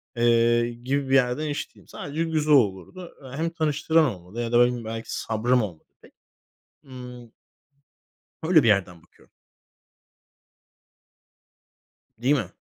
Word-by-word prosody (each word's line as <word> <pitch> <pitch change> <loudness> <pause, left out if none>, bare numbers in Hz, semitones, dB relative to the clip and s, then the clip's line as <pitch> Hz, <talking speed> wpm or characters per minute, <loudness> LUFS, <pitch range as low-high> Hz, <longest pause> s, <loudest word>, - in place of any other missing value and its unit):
eee, 120 0 +3
gibi 130 +3 -3
bir - - 0
yerde 130 +3 +2
n - - -3
hiç 145 - -5
değilim. - - -20
Sadece 150 +3 -4
güzel 155 -2 +1
olurdu. 130 - 0
Eee, 130 +1 -9
hem 165 +2 -1
tanıştıran 160 0 +1
olmadı 95 -2 -5
ya 115 -1 -3
da 120 - +4
ne 120 - +7
bileyim 120 -2 -3
belki 115 0 -6
sabrım 120 +3 0
olmadı 90 -7 -7 0.2
pek. - - -20 0.7
Imm 125 -2 -11 1.1
öyle 160 -2 +5
bir - - +2
yerden 95 -5 +1
bakıyorum. - - -26 2.9
Değil 125 +5 +2
mi? - - -2
125 Hz, 140 wpm, -24 LUFS, 115-150 Hz, 2.9 s, ne